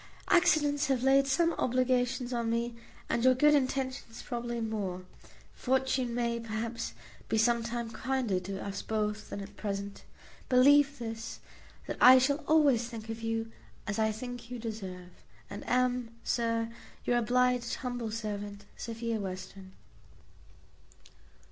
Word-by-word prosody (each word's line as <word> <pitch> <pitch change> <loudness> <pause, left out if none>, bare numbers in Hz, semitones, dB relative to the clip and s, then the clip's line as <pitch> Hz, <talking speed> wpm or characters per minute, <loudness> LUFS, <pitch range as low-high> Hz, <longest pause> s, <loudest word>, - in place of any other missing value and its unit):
Accidents 300 -4 +4
have 260 -2 +1
laid 270 +1 +5
some 335 +5 +2
obligations 255 0 +1
on 235 -1 -1
me, 235 +1 -1 0.3
and 235 - 0
your 255 0 +6
good 295 +4 +5
intentions 260 -3 -1
probably 240 0 -3
more. 205 -5 -3 0.5
Fortune 260 -2 0
may, 235 -1 0
perhaps, 230 +1 -4 0.4
be - - +1
some 235 +1 +3
time 235 0 -4
kinder 235 -4 -1
to 195 +2 -6
us 200 0 -4
both 215 -1 -2
than 200 - -5
at 200 +1 -10
present. 200 -1 -4 0.5
Believe 280 +2 +6
this, 225 -1 -6 0.5
that - - -4
I 255 +1 +10
shall 260 +2 +3
always 285 -7 +4
think 225 -2 -8
of 225 0 -5
you 225 0 -2 0.3
as 210 +1 -2
I 220 0 +3
think 245 +1 -7
you 250 - -5
deserve, 190 -6 -6 0.4
and 205 - -6
am, 250 -2 +1
Sir, 230 -1 0 0.3
your 240 0 +3
obliged 250 +1 +2
humble 245 -3 -4
servant, 205 -2 -5
Sophia 230 -1 -3
Western. 190 0 -7
235 Hz, 135 wpm, -31 LUFS, 220-255 Hz, 0.5 s, I